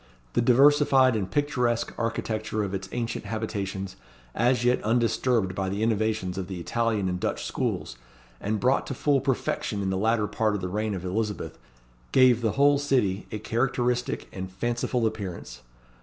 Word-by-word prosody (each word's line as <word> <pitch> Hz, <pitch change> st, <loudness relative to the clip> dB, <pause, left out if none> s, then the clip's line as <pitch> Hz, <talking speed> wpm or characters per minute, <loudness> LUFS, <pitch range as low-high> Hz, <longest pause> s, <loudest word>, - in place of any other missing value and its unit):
The -, -, +2 dB
diversified 135 Hz, 0 st, +5 dB
and 100 Hz, -4 st, -2 dB
picturesque 125 Hz, -5 st, 0 dB
architecture 110 Hz, -2 st, -2 dB
of 100 Hz, -1 st, -4 dB
its 95 Hz, 0 st, -4 dB
ancient 115 Hz, -1 st, -3 dB
habitations, 100 Hz, -3 st, -4 dB, 0.4 s
as 120 Hz, +1 st, +2 dB
yet 125 Hz, +1 st, +2 dB
undisturbed 115 Hz, -2 st, +1 dB
by 95 Hz, 0 st, -2 dB
the 100 Hz, +3 st, -2 dB
innovations 110 Hz, -4 st, 0 dB
of 90 Hz, -, -4 dB
the 95 Hz, -2 st, -5 dB
Italian 110 Hz, +1 st, 0 dB
and 90 Hz, 0 st, -2 dB
Dutch -, -, -2 dB
schools, -, -, -3 dB, 0.4 s
and 105 Hz, +1 st, -1 dB
brought 130 Hz, +4 st, +2 dB
to 135 Hz, -, -4 dB
full 140 Hz, +1 st, +2 dB
perfection 120 Hz, -5 st, -1 dB
in 95 Hz, -, 0 dB
the 95 Hz, -, 0 dB
latter 110 Hz, +1 st, +2 dB
part 110 Hz, 0 st, 0 dB
of 100 Hz, -, -3 dB
the 90 Hz, -, -3 dB
reign 105 Hz, +2 st, -1 dB
of 95 Hz, -1 st, -6 dB
Elizabeth, 105 Hz, +3 st, -3 dB, 0.5 s
gave 125 Hz, -2 st, +5 dB
the 110 Hz, -2 st, +1 dB
whole 140 Hz, 0 st, +4 dB
city 120 Hz, -9 st, 0 dB
a 110 Hz, -, -3 dB
characteristic 120 Hz, +2 st, -1 dB
and 95 Hz, -1 st, -6 dB
fanciful 120 Hz, +3 st, -1 dB
appearance. 95 Hz, -, -5 dB
110 Hz, 165 wpm, -26 LUFS, 100-125 Hz, 0.5 s, diversified